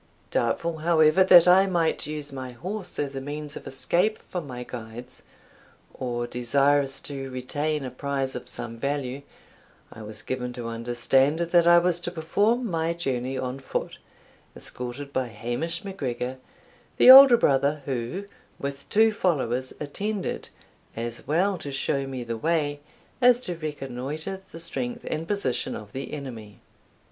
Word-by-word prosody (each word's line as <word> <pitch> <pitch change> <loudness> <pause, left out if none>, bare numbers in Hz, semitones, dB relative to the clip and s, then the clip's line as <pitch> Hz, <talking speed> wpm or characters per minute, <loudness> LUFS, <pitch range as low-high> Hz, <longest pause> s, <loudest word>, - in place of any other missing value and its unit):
Doubtful, 160 +8 0
however, 160 +2 +4
that 180 -2 +8
I 190 +2 +6
might 170 -5 +1
use 150 -2 -2
my 130 -2 -6
horse 185 - -5
as 140 -1 -2
a 135 - -3
means 150 +1 -6
of - - -9
escape 175 +10 0
from 175 -5 -6
my 125 -2 -6
guides, 120 +1 -9 0.7
or 120 -2 -3
desirous 135 +3 +1
to 135 -2 -4
retain 145 +3 -2
a 130 - -5
prize 135 0 -2
of 125 - -6
some 115 -1 -6
value, 140 0 -2 0.7
I 110 - -11
was 110 0 -7
given 125 +1 -3
to 120 -2 -4
understand 120 +5 +2
that 170 0 +3
I 175 0 +8
was 175 0 +3
to 175 - -2
perform 205 +9 +1
my 165 -4 -1
journey 130 -5 -2
on 130 +1 -4
foot, 135 - -4 0.6
escorted 125 +3 -5
by 130 -1 0
Hamish 120 - -3
MacGregor, 130 -9 -4 0.6
the - - +7
elder 265 -2 +11
brother, 140 - +2
who, 135 +9 -3 0.3
with 140 0 -6
two 220 +1 +5
followers, 130 - 0
attended, 200 +8 -3 0.5
as 120 +1 -5
well 180 +5 +1
to 145 - -6
show 140 0 -1
me 130 -2 -5
the 115 -1 -4
way, 150 +1 0 0.4
as 245 -1 +6
to 180 -7 -3
reconnoitre 150 +3 -5
the - - -9
strength 235 +8 -2
and 160 +1 -3
position 200 -12 -1
of 105 -1 -9
the 135 +1 -5
enemy. 115 -8 -8
140 Hz, 150 wpm, -26 LUFS, 125-170 Hz, 0.7 s, elder